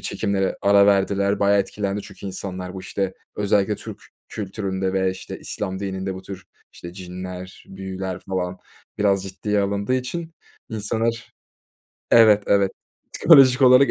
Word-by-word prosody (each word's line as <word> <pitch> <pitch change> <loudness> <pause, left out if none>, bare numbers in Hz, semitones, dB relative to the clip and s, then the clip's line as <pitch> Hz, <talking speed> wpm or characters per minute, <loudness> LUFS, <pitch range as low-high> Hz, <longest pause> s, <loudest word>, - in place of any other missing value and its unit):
çekimlere 95 -1 -1
ara 100 0 +6
verdiler 100 0 +2
bayağı 100 0 +4
etkilendi 100 0 -3
çünkü 100 0 -10
insanlar. 95 -1 -5
Bu, 95 - -6
işte, 95 0 -3 0.2
özellikle 105 0 +1
Türk - - -9 0.3
kültüründe 95 -2 -3
ve, 95 -1 +1
işte, 95 - -8
İslam 95 -2 -4
dininde 95 -1 -3
bu 95 - -9
tür, 95 -1 -9 0.3
işte, 85 0 -10
cinler, 90 0 -8
büyüler 95 -1 -5
falan 90 -1 -2 0.4
biraz 100 -2 +2
ciddiye 100 +2 -2
alındığı 100 +4 0
için 160 +6 -4 0.3
insanlar 115 +2 -2 0.8
Evet, 110 -3 +7
evet, 100 -1 +3 0.4
psikolojik 135 -4 +6
olarak 130 +1 +7
100 Hz, 135 wpm, -22 LUFS, 95-105 Hz, 0.8 s, Evet